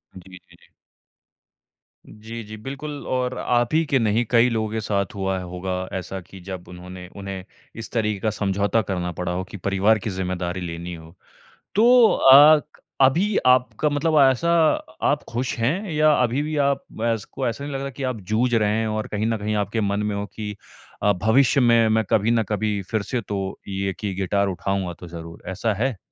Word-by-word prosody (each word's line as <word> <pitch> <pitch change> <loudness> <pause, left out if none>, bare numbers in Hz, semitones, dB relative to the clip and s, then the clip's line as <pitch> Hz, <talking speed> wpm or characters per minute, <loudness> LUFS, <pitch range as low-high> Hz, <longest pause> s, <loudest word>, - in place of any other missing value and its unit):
जी, 95 0 -12
जी, 90 - -21
जी। - - -24 1.4
जी, 110 +2 -8
जी, 110 +1 -9
बिल्कुल 140 +5 -7
और 125 0 -1
आप 120 +3 +1
ही 165 +1 +4
के 135 -2 +1
नहीं, 110 +1 +2
कई 120 +1 +4
लोगों 110 -2 -1
के 110 - -2
साथ 100 -2 -1
हुआ 95 -1 -1
है 90 - -5
होगा 90 +1 -4
ऐसा 95 +1 -5
कि 95 +3 -14
जब 95 -2 -7
उन्होंने 90 0 -10
उन्हें 95 -2 -6 0.3
इस 115 - -8
तरीके 105 -4 -1
का 110 - 0
समझौता 100 +2 0
करना 90 -2 -2
पड़ा 90 0 -2
हो 90 +1 -2
कि 100 - -7
परिवार 100 +3 +2
की 105 - -4
ज़िम्मेदारी 90 -1 -3
लेनी 85 0 -5
हो। 80 +1 -12 0.6
तो 235 +2 +6
अ, 145 +3 +8 0.4
अभी 175 +11 +3
आपका 130 +4 +3
मतलब 150 +1 +2
ऐसा 170 +7 0 0.6
आप 145 0 0
खुश 120 +2 -2
हैं 165 - -1
या 155 0 +4
अभी 125 +4 0
भी 155 0 -3
आप 140 -1 0 0.3
ऐस 110 -3 -3
को 130 -2 -4
ऐसा 120 +4 -4
नहीं 145 0 -5
लग 135 - -2
रहा 140 - -3
कि 135 +1 -8
आप 130 -4 -2
जूझ 120 +3 +2
रहे 105 -2 +2
हैं 110 - -1
और 110 0 -2
कहीं 105 +1 -2
न 115 -1 0
कहीं 105 +1 -2
आपके 105 +2 -1
मन 100 0 0
में 105 - -1
हो 100 0 -3
कि 105 0 -7 0.5
अ, 105 - +4
भविष्य 120 +8 +3
में 115 -2 +5
मैं 110 0 +2
कभी 110 +2 +2
ना 115 -1 +2
कभी 105 0 -1
फिर 110 - +1
से 120 +3 -2
तो 100 -2 -4
ये 95 0 -2
कि 100 -2 -3
गिटार 100 +1 0
उठाऊँगा 95 -1 -2
तो 90 - -9
ज़रूर, 85 0 -9
ऐसा 105 +3 -1
है? 115 0 -1
110 Hz, 200 wpm, -23 LUFS, 95-125 Hz, 1.4 s, अ